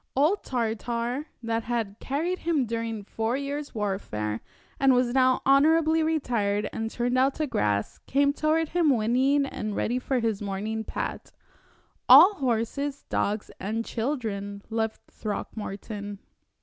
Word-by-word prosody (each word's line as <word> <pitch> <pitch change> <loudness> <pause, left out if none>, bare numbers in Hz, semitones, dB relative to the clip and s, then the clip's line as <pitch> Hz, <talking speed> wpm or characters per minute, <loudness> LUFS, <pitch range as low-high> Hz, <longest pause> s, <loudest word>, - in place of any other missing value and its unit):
Old 310 +10 +2
Tartar, 235 +3 -2 0.2
that 230 0 -1
had 225 -4 -2
carried 330 +7 -2
him 320 -6 +1
during 230 -2 -3
four 225 +4 -2
years' 280 0 -4
warfare, 115 - -2 0.4
and 270 -1 +5
was 245 -1 +2
now 255 -1 +3
honorably 315 +3 +4
retired 235 -10 0
and 225 0 -2
turned 245 +2 0
out 265 +1 +3
to 310 - -1
grass, 105 - -1
came 280 +1 +3
toward 310 +1 +1
him 345 -3 +2
whinnying 260 +4 +3
and 215 -6 -4
ready 245 +3 0
for 260 +1 -1
his 225 -3 -1
morning 210 +2 -3
pat - - -5 0.8
all 405 - +10
horses, 270 - -2
dogs, 210 +1 -1
and 220 +4 -2
children 215 -6 -3
loved 220 -1 -1
Throckmorton. 205 -1 -5
240 Hz, 135 wpm, -27 LUFS, 215-280 Hz, 0.8 s, all